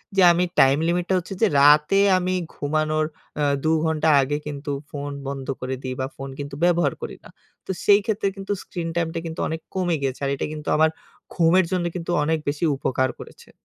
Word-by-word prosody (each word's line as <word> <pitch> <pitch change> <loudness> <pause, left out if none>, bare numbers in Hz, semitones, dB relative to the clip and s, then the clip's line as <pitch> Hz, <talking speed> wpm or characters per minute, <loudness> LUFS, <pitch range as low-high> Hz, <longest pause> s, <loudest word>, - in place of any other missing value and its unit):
যে 190 - +4
আমি 175 +1 +2 0.2
টাইম 135 +1 +6
লিমিটটা 175 +2 0
হচ্ছে 180 +2 -8
যে 225 - +6
রাতে 150 +6 +6 0.2
আমি 185 0 -1 0.2
ঘুমানোর 155 +1 0 0.4
আ - - +2 0.2
দু 155 - +2
ঘন্টা 160 0 +1
আগে 145 +2 -1
কিন্তু 145 0 -5 0.2
ফোন 145 0 -5 0.2
বন্ধ 135 -1 -5
করে 130 +1 -3
দেই 130 -1 -3
বা 130 - -1
ফোন 135 0 -7
কিন্তু 140 0 -6
ব্যবহার 175 -1 +3
করি - - -6
না। - - -14 0.4
তো - - -3
সেই 205 0 +7
ক্ষেত্রে 215 -2 0
কিন্তু 195 +1 -6
স্ক্রিন 170 -2 -5
টাইমটা 165 -1 -1
কিন্তু 160 -1 -6
অনেক 160 0 -4
কমে 180 -3 0
গেছে। 135 -1 -2
আর 140 - 0
এটা - - -3
কিন্তু 150 -1 -8
আমার 160 +1 +5 0.4
ঘুমের 175 +1 +4
জন্য 180 -2 0
কিন্তু 175 0 -4
অনেক 160 +1 +1
বেশি 145 +4 -1
উপকার 130 -1 0
করেছে। - - -13
160 Hz, 200 wpm, -23 LUFS, 145-175 Hz, 0.4 s, সেই